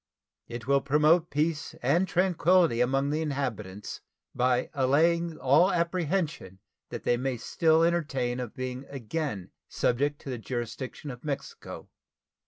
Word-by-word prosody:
It 120 Hz, -1 st, -7 dB
will 140 Hz, +1 st, +3 dB
promote 155 Hz, +4 st, +3 dB
peace 150 Hz, +1 st, -1 dB
and 165 Hz, +9 st, +3 dB
tranquillity 175 Hz, -7 st, +3 dB
among 135 Hz, +3 st, +1 dB
the 155 Hz, +2 st, 0 dB
inhabitants, 120 Hz, -10 st, -4 dB, 0.3 s
by 125 Hz, 0 st, +1 dB
allaying 160 Hz, +5 st, +2 dB
all 145 Hz, +9 st, +4 dB
apprehension 170 Hz, -, -1 dB, 0.3 s
that -, -, -6 dB
they 120 Hz, -, +2 dB
may 130 Hz, 0 st, -2 dB
still 160 Hz, +7 st, +2 dB
entertain 140 Hz, -8 st, 0 dB
of 125 Hz, -3 st, -6 dB
being 130 Hz, +1 st, -5 dB
again 130 Hz, -, -4 dB, 0.2 s
subjected 145 Hz, +4 st, 0 dB
to 135 Hz, -, -5 dB
the 125 Hz, -, -4 dB
jurisdiction 125 Hz, +4 st, -5 dB
of 125 Hz, 0 st, -11 dB
Mexico. 140 Hz, -2 st, -6 dB
140 Hz, 130 wpm, -28 LUFS, 125-165 Hz, 0.3 s, all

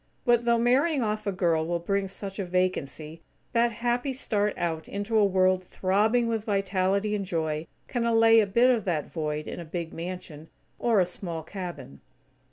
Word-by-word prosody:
But, 240 Hz, -1 st, +3 dB
though 235 Hz, 0 st, +4 dB
marrying 260 Hz, +5 st, +2 dB
off 215 Hz, 0 st, -2 dB
a -, -, +2 dB
girl 170 Hz, -4 st, +1 dB
will 175 Hz, 0 st, 0 dB
bring 195 Hz, +3 st, -1 dB
such 195 Hz, +1 st, -8 dB
a -, -, 0 dB
vacancy, 165 Hz, -4 st, -2 dB, 0.3 s
that 235 Hz, 0 st, +3 dB
happy 245 Hz, +4 st, -1 dB
start 210 Hz, -5 st, -1 dB
out 165 Hz, -2 st, -2 dB
into 205 Hz, +3 st, -3 dB
a 215 Hz, -, +5 dB
world 185 Hz, -1 st, +3 dB
throbbing 210 Hz, +7 st, +1 dB
with 225 Hz, -2 st, -1 dB
vitality 195 Hz, 0 st, 0 dB
and 205 Hz, -1 st, -1 dB
joy, 160 Hz, -4 st, -2 dB, 0.2 s
can 245 Hz, -3 st, -1 dB
allay 225 Hz, -1 st, +5 dB
a 210 Hz, -, +3 dB
bit 235 Hz, +6 st, +4 dB
of 235 Hz, -4 st, +1 dB
that 165 Hz, -5 st, -2 dB
void 155 Hz, -2 st, -3 dB
in -, -, -6 dB
a -, -, -5 dB
big 170 Hz, 0 st, -5 dB
mansion, 165 Hz, -3 st, -7 dB, 0.3 s
or 230 Hz, -4 st, +3 dB
a -, -, +3 dB
small 170 Hz, -2 st, -6 dB
cabin. 170 Hz, -7 st, -8 dB
195 Hz, 180 wpm, -27 LUFS, 170-225 Hz, 0.3 s, a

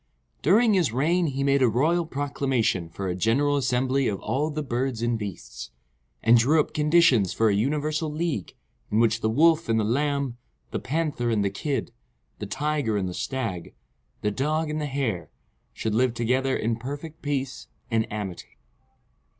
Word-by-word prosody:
During 215 Hz, -, +4 dB
his 175 Hz, -, +2 dB
reign 165 Hz, +8 st, +2 dB
he 135 Hz, -1 st, -2 dB
made 140 Hz, 0 st, +3 dB
a 125 Hz, -, +5 dB
royal 160 Hz, +9 st, +1 dB
proclamation 135 Hz, -, -1 dB
for 95 Hz, +4 st, -5 dB
a 90 Hz, -, -1 dB
general 120 Hz, +10 st, +2 dB
assembly 130 Hz, 0 st, +1 dB
of 100 Hz, -2 st, -2 dB
all 135 Hz, +8 st, -1 dB
the 155 Hz, 0 st, -3 dB
birds 125 Hz, -2 st, -2 dB
and 120 Hz, 0 st, +1 dB
beasts, 100 Hz, -, -7 dB, 0.5 s
and 115 Hz, +1 st, +6 dB
drew 145 Hz, +7 st, +4 dB
up 150 Hz, -, 0 dB
conditions 150 Hz, -, +4 dB
for 110 Hz, -1 st, +3 dB
a -, -, +2 dB
universal 150 Hz, +7 st, 0 dB
league, 155 Hz, -, -3 dB, 0.3 s
in 105 Hz, -, +1 dB
which 115 Hz, 0 st, +2 dB
the 110 Hz, -, +1 dB
Wolf 160 Hz, +5 st, +3 dB
and 110 Hz, 0 st, +3 dB
the -, -, +1 dB
Lamb, 140 Hz, +2 st, 0 dB, 0.3 s
the -, -, -2 dB
Panther 145 Hz, -4 st, -1 dB
and 105 Hz, -3 st, +1 dB
the 100 Hz, -, 0 dB
Kid, 135 Hz, +4 st, -3 dB, 0.5 s
the 105 Hz, -, -5 dB
Tiger 145 Hz, -5 st, -1 dB
and 95 Hz, -2 st, -1 dB
the 90 Hz, -, -4 dB
Stag, 115 Hz, -7 st, -4 dB, 0.5 s
the 105 Hz, -, 0 dB
Dog 150 Hz, +6 st, -1 dB
and 155 Hz, 0 st, -2 dB
the 150 Hz, -, -2 dB
Hare, 115 Hz, -, -2 dB, 0.4 s
should 110 Hz, -, -3 dB
live 120 Hz, +1 st, +2 dB
together 130 Hz, +3 st, +1 dB
in 115 Hz, 0 st, -1 dB
perfect 145 Hz, +6 st, -7 dB
peace 135 Hz, -2 st, -3 dB, 0.2 s
and 110 Hz, -1 st, 0 dB
amity. 100 Hz, -4 st, -6 dB
130 Hz, 175 wpm, -25 LUFS, 110-150 Hz, 0.5 s, and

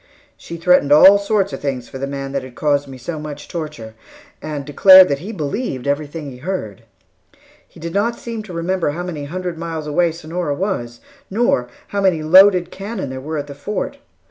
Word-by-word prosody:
She 170 Hz, -, -9 dB
threatened 165 Hz, -4 st, +3 dB
all 190 Hz, +7 st, +8 dB
sorts 200 Hz, -1 st, 0 dB
of -, -, -5 dB
things 130 Hz, -4 st, -3 dB
for 135 Hz, -, -9 dB
the 135 Hz, -, -3 dB
man 135 Hz, 0 st, -5 dB
who 140 Hz, -, 0 dB
had 130 Hz, -2 st, -11 dB
caused 145 Hz, -1 st, 0 dB
me 135 Hz, -1 st, -10 dB
such 150 Hz, +1 st, -7 dB
torture, 150 Hz, -10 st, -6 dB, 0.5 s
and 150 Hz, -2 st, -5 dB
declared 185 Hz, +5 st, +8 dB
that 140 Hz, -1 st, -1 dB
he 195 Hz, +8 st, -7 dB
believed 155 Hz, -, -4 dB
everything 145 Hz, +1 st, -3 dB
he 125 Hz, -, -11 dB
heard. 130 Hz, -, -5 dB, 0.9 s
He -, -, -17 dB
did 165 Hz, +1 st, -6 dB
not 230 Hz, +4 st, 0 dB
seem 230 Hz, -2 st, -6 dB
to 195 Hz, -, -10 dB
remember 170 Hz, 0 st, -1 dB
how 175 Hz, +3 st, -4 dB
many 160 Hz, -5 st, -5 dB
hundred 175 Hz, +2 st, -5 dB
miles 165 Hz, -2 st, -5 dB
away 165 Hz, +3 st, +1 dB
Sonora 165 Hz, -1 st, -4 dB
was, 120 Hz, -, -3 dB, 0.3 s
nor 195 Hz, -, +1 dB, 0.2 s
how 200 Hz, -, -2 dB
many 180 Hz, -5 st, +2 dB
loaded 180 Hz, +2 st, +6 dB
cannon 195 Hz, -, -5 dB
there 130 Hz, 0 st, -6 dB
were 155 Hz, +3 st, -4 dB
at 145 Hz, -, -3 dB
the 145 Hz, -, -9 dB
Fort. 170 Hz, +10 st, -4 dB
160 Hz, 195 wpm, -19 LUFS, 140-185 Hz, 0.9 s, all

